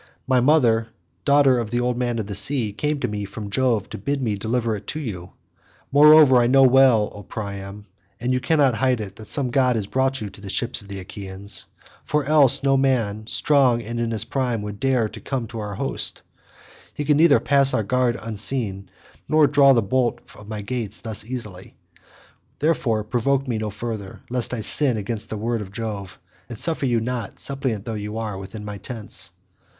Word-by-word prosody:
My 130 -1 +3
mother, 120 -5 +3 0.4
daughter 140 -3 +4
of 115 -3 -3
the 120 +2 -1
old 125 0 0
man 120 -1 -1
of 110 - -2
the 100 - -6
sea, 115 0 +2
came 150 +6 -1
to 125 - 0
me 105 -2 -4
from 100 +1 -7
Jove 115 -3 +1
to - - -7
bid 140 +7 -2
me 115 -5 -1
deliver 110 +2 -1
it 100 0 -9
to 155 - -4
you. 95 - -6 0.6
Moreover 150 -1 +7
I 120 -1 +4
know 135 +2 +5
well, 130 -5 +5
O 105 - -9
Priam, 100 0 -7 0.3
and 125 +2 -1
you 130 - +1
cannot 140 -1 +2
hide 130 +1 +1
it, 100 -1 -7
that 110 - -11
some 135 -4 0
god 125 -1 +3
has 110 -3 -1
brought 130 +5 0
you 105 -2 -6
to 100 - -15
the 100 - -8
ships 120 +4 -1
of 100 - -16
the 100 -1 -6
Achaeans, 95 -1 -7 0.4
for 150 -2 -1
else, 145 -3 +5
no 135 -1 +3
man 125 -6 +1
however 110 0 -13
strong 130 -6 +2
and 115 +2 -5
in 120 -1 -1
his 115 -1 0
prime 125 -5 -2
would 105 -1 -6
dare 130 -4 +1
to - - -11
come 130 -4 -3
to 115 -1 -6
our 105 -1 -5
host; - - -1 0.7
he 145 - -3
could 150 0 +3
neither 160 -6 +6
pass 140 +3 +4
our 110 - 0
guard 125 +2 +1
unseen, 110 -2 -2 0.4
nor 155 -1 +5
draw 140 -1 +5
the 120 -4 +3
bolt 120 +4 0 0.2
of 105 - -13
my 105 -1 -5
gates 115 -1 -4
thus 110 -2 -3
easily; 105 -6 -6 0.8
therefore, 135 -8 0
provoke 130 +5 0
me 115 -3 -1
no 110 -1 -3
further, 105 -1 -6
lest 125 -2 -1
I 125 -3 -3
sin 130 +1 +1
against 105 +1 -4
the 110 - -4
word 115 +1 -2
of 95 -2 -8
Jove, 100 -3 -6 0.3
and 120 - -7
suffer 160 +1 0
you 120 -2 +2
not, 120 -2 -4
suppliant 130 -7 -2
though 115 - -4
you 105 0 -5
are, 110 -3 -3
within 100 +2 -8
my 105 -1 -6
tents." 110 +1 -6
115 Hz, 205 wpm, -22 LUFS, 105-130 Hz, 0.8 s, Moreover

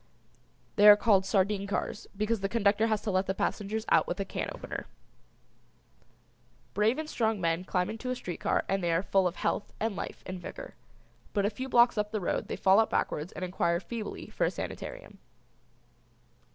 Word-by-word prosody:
The 205 0 +7
are 210 - +12
called 200 -3 +3
"Sardine 200 0 +1
Cars" 200 - -3
because 215 +2 0
the 195 0 -2
conductor 215 0 +2
has 215 -2 0
to 210 - -1
let 185 +1 +1
the 190 - -1
passengers 215 +3 -2
out - - +4
with - - -3
a 195 - -1
can - - -3
opener. - - -6 1.9
Brave 215 +4 +2
and 315 0 -4
strong 225 -7 0
men 165 0 0
climb 180 -1 0
into 225 +4 -5
a 255 - 0
street 180 -8 -6
car - - 0
and 195 -1 0
they 170 - +1
are 165 +3 +1
full 195 -2 +2
of 175 - -4
health - - -2
and 220 -2 -1
life - - -6
and 185 -1 -6
vigor, - - -8 0.6
but 200 -1 +1
a 205 - +1
few 260 +5 -6
blocks 240 -2 +5
up 210 0 0
the 215 0 -2
road 180 - -2
they - - -3
fall 190 +2 +5
out 225 - +3
backwards 150 +4 -1
and 185 - -4
inquire 170 -1 0
feebly 215 +4 -6
for - - -1
a - - +2
sanitarium. - - -7
205 Hz, 195 wpm, -29 LUFS, 190-220 Hz, 1.9 s, are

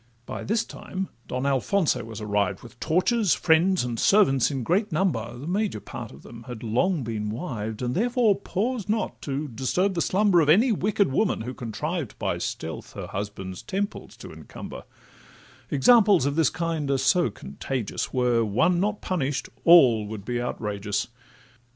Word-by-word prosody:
By - - -6
this 220 +3 0
time 190 -2 -6 0.2
Don 125 +2 -3
Alfonso 140 - +1
was 115 -2 -8
arrived, 105 -2 -1
With 120 0 -14
torches, 185 +5 +2
friends, 175 +2 +3
and 120 -2 -3
servants 170 - +4
in 135 -4 -3
great 190 - +1
number; 120 - -1
The 135 - -8
major 195 - -1
part - - -8
of 65 - -14
them 115 -1 -12
had 120 -3 -7
long 135 - +1
been 110 -2 -3
wived, 110 -3 -4
And 125 0 -1
therefore 235 - +2
paused 215 +2 -2
not 215 +1 -1
to 145 +2 -3
disturb 140 - 0
the 170 - -1
slumber 190 -2 +3
Of 150 - +1
any 220 +10 +5
wicked 200 -5 +1
woman, 200 - +1
who 125 +3 -5
contrived 130 - -4
By - - -2
stealth 80 -1 -5
her - - -6
husband's 95 -2 -6
temples 200 - -4
to - - -10
encumber: - - -9 0.8
Examples 200 - +5
of 140 0 0
this 160 -4 +3
kind 160 -3 -2
are 140 - +2
so 170 +6 +3
contagious, 130 -7 -4
Were 125 -3 +2
one 120 - +2
not 210 +2 -1
punish'd, 140 -8 -2 0.2
all 125 -11 +7
would 105 -2 -7
be 120 +1 -2
outrageous. 105 -3 -3
140 Hz, 165 wpm, -25 LUFS, 115-190 Hz, 0.8 s, all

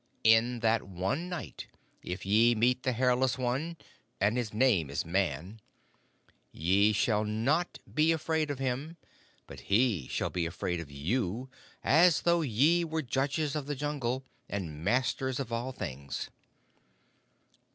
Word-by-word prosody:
In 115 +2 +4
that 115 -1 +3
one 95 - -3
night, 180 -3 -6 0.3
if 95 +3 -6
ye 115 +4 +4
meet 125 +3 +2
the 130 - 0
Hairless 125 +2 +2
One 135 +7 -2 0.4
and 100 +4 +2
his 120 -3 -2
name 105 - +2
is 70 - -2
Man 90 +3 -2 0.9
ye 95 +6 +3
shall 105 +1 +1
not 120 +11 0 0.2
be 155 +1 +4
afraid 160 -1 0
of 145 - -2
him, 135 +5 -3 0.5
but - - -11
he 100 - +2
shall - - -2
be 85 -2 -1
afraid 85 +1 -3
of 80 -3 -7
you, 105 - -2 0.3
as 165 +1 +5
though 170 0 +3
ye 150 +6 +3
were 160 -1 -2
judges 140 +4 -1
of 145 -2 -3
the 145 - -2
Jungle 135 -3 -2 0.2
and 80 -6 -5
masters 130 +4 0
of 120 -4 -4
all 120 +3 -2
things. 70 - -6
120 Hz, 140 wpm, -30 LUFS, 100-140 Hz, 0.9 s, as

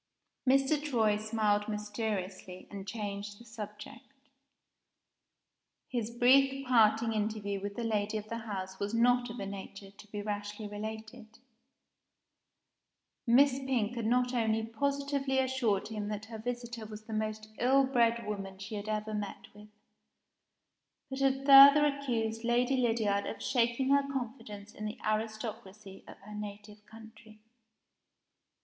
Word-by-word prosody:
Mr. 275 +3 +3
Troy 225 -8 +2
smiled 215 -1 0
mysteriously, 205 -3 -4
and 200 -1 -7
changed 205 -1 -5
the 235 - -14
subject. 225 +4 -10 1.8
His 235 -3 -2
brief 270 +3 +4
parting 225 -2 +4
interview 210 -2 -2
with 200 0 -5
the 235 - -3
lady 215 -1 0
of 210 0 -6
the 230 +1 -4
house 190 -4 -6
was 205 +3 -2
not 245 +1 +3
of 235 - -7
a 200 - -3
nature 195 0 -8
to 200 +1 -16
be 205 0 -6
rashly 205 0 -4
related. 220 +1 -8 1.9
Miss 265 +3 +5
Pink 250 -5 -1
had 230 -2 -2
not 250 +1 +2
only 225 -2 +1
positively 280 +3 -1
assured 255 -7 +1
him 210 -2 -4
that 210 0 -4
her 220 -1 -8
visitor 240 -1 -5
was 215 0 -9
the 220 - -8
most 215 0 -3
ill 265 +3 +4
bred 235 -3 +2
woman 195 -2 -5
she 195 +3 -8
had 210 0 -5
ever 215 0 -2
met 205 -1 -5
with, 210 +1 -14 1.4
but 265 - -4
had 270 0 +1
further 280 +1 +10
accused 240 -6 -1
Lady 245 +3 +2
Lydiard 225 -5 +1
of - - -5
shaking 245 +1 +1
her 280 0 +3
confidence 220 -5 -6
in 215 - -7
the 215 - -5
aristocracy 215 -2 -4
of - - -11
her 210 +2 -11
native 210 0 -8
country. 220 -1 -14
220 Hz, 140 wpm, -31 LUFS, 210-245 Hz, 1.9 s, further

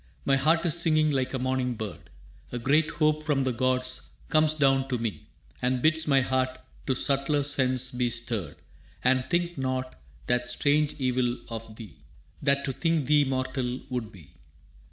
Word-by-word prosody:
«My 135 - +4
heart 160 +5 +2
is 170 0 +1
singing 155 -2 +3
like 130 -2 0
a 135 - -2
morning 130 -1 -1
bird. 110 -4 -7 0.4
A 125 - -3
great 145 +6 +2
hope 155 -1 +1
from 145 -3 +1
the 130 -1 0
gods 130 +1 0 0.2
comes 155 0 +3
down 135 -2 +3
to 130 -2 -1
me 115 -3 -4 0.3
And 125 0 +1
bids 160 0 +2
my 135 -2 +4
heart 130 0 0 0.3
to 130 - +1
subtler 140 +2 +2
sense 130 -2 +1
be 125 -1 0
stirred 115 -4 -3 0.5
And 125 0 +2
think 175 -2 0
not 130 - -3 0.2
that 125 0 0
strange 145 +4 +1
evil 125 -2 0
of 115 -1 -7
thee 110 - -11 0.4
That 140 0 +2
to 135 - -2
think 165 -1 0
thee 150 +1 +4
mortal 130 -1 -2
would 120 -3 -3
be. 80 - -16
130 Hz, 170 wpm, -27 LUFS, 125-145 Hz, 0.5 s, My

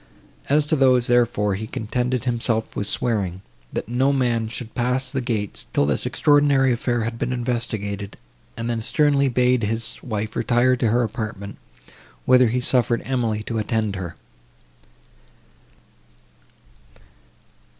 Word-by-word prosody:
As 145 +1 +3
to 155 - +1
those, 130 -3 +4
therefore, 120 -4 +2
he 110 +3 -4
contented 125 +3 -2
himself 115 -2 -1
with 100 - -2
swearing, 100 -6 -1 0.3
that - - -4
no 130 +4 +2
man 120 -4 +1
should 115 0 -7
pass 125 +1 0
the 135 -2 -1
gates, 110 -5 -3
till 70 - +3
this 70 -3 0
extraordinary 145 -3 +3
affair 120 0 -1
had 115 +1 -4
been 125 - -1
investigated, 110 -5 -3 0.4
and 115 - -3
then 115 -1 -1
sternly 140 +3 +2
bade 125 -1 +2
his 115 +2 -2
wife 110 -2 -4
retire 125 +1 +2
to 125 -2 0
her 120 +3 +2
apartment, 110 -3 -5 0.7
whither 125 -1 +6
he 125 +3 0
suffered 120 -2 +2
Emily 115 -5 -1
to 115 0 -3
attend 110 -1 -1
her. 90 -3 -6
120 Hz, 135 wpm, -22 LUFS, 110-125 Hz, 0.7 s, whither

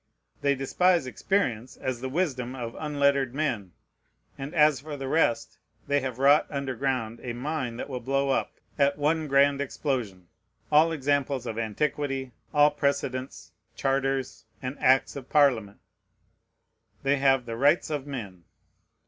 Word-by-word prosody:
They 140 0 +2
despise 170 +4 +2
experience 130 - -1
as 130 -2 -3
the 130 - -3
wisdom 130 -6 -2
of 120 -2 -6
unlettered 140 -3 +1
men; 120 - -2 0.6
and 140 +5 -7
as 150 -3 +5
for 150 0 -7
the 135 -1 -5
rest, 135 -5 +1 0.3
they 145 0 +2
have 130 -3 -4
wrought 140 +3 +5
under 140 -2 -3
ground 125 -3 -2
a 120 - -4
mine 125 -2 -3
that - - -5
will 130 -3 -4
blow 135 +2 0
up, - - 0 0.3
at 140 0 +3
one 155 +2 +1
grand 140 0 +3
explosion, 120 - -3 0.4
all 155 +2 +5
examples 140 -3 0
of 115 -1 -4
antiquity, 135 +3 -2 0.2
all 150 0 +5
precedents, 140 -2 -2 0.2
charters, 135 -4 -1
and 130 +2 -5
acts 130 +1 +3
of 135 -2 -8
Parliament. 125 -9 +3 1.3
They 140 +1 +2
have 135 -2 +3
"the 115 -1 -5
rights 145 +6 +3
of 145 -2 -3
men." 100 - -7
135 Hz, 145 wpm, -27 LUFS, 125-145 Hz, 1.3 s, as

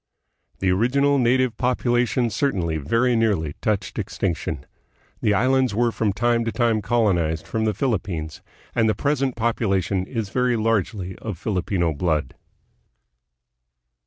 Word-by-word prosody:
The 95 -1 +1
original 140 +8 +2
native 125 -1 +2
population 125 -1 +1
certainly 95 - 0
very 115 - +1
nearly 100 -10 +1
touched 105 -3 -1
extinction. - - -3 0.6
The 105 - +2
islands 130 +1 +2
were 120 +1 +2
from 110 -2 0
time 120 +3 +1
to 115 - -1
time 115 -3 +1
colonized 90 -9 +1
from 110 -1 -1
the 110 - +1
Philippines, 90 - -2 0.3
and 115 -2 +2
the 110 - +1
present 135 0 0
population 100 -5 0
is 115 -5 -3
very 125 +2 +1
largely 105 -4 -1
of 105 -6 -6
Filipino 90 -3 -1
blood. 75 0 -1
110 Hz, 130 wpm, -23 LUFS, 95-120 Hz, 0.6 s, original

